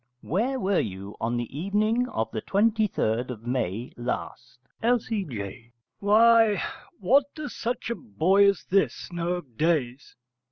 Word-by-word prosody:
Where 245 - 0
were 195 -4 +1
you 100 0 -5
on 115 +2 0
the 120 +2 -5
evening 215 - +1
of 110 0 -2
the 110 - -3
23rd 200 - +1
of 115 -3 -7
May 120 -3 -2
last? 125 +1 -5 0.2
L.C.J. 150 - -2 0.3
Why, 220 +1 +5 0.4
what 255 +9 +4
does 305 -2 -6
such 235 0 -3
a - - -1
boy 200 -3 +3
as 200 - -1
this 195 -1 0
know 175 +1 -1
of 140 -11 -7
days. 145 -5 0
180 Hz, 135 wpm, -26 LUFS, -, 0.4 s, Why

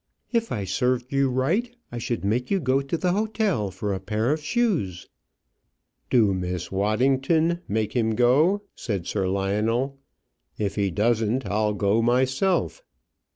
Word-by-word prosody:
"If 230 -1 0
I 105 - -2
served 125 +7 -1
you 135 -1 +2
right, 175 - 0 0.2
I 120 - -5
should 115 -3 -3
make 120 +5 0
you 195 - +2
go 135 -3 +1
to 140 +4 -3
the 180 +2 0
hotel 205 - 0
for 100 +2 -3
a 95 - -3
pair 110 +6 -1
of 155 +1 -1
shoes." 155 - -1 1.0
"Do, 110 -6 +4
Miss 90 -1 -3
Waddington; 135 - +2
make 110 0 -1
him 110 -3 +1
go," 150 - +3
said 100 -7 -4
Sir 95 -1 -1
Lionel. 110 +8 0 0.6
"If 100 -2 -1
he 100 -2 0
doesn't, 115 +5 +1
I'll 105 +2 0
go 100 +2 +2
myself." 130 - +1
120 Hz, 150 wpm, -25 LUFS, 105-140 Hz, 1.0 s, Do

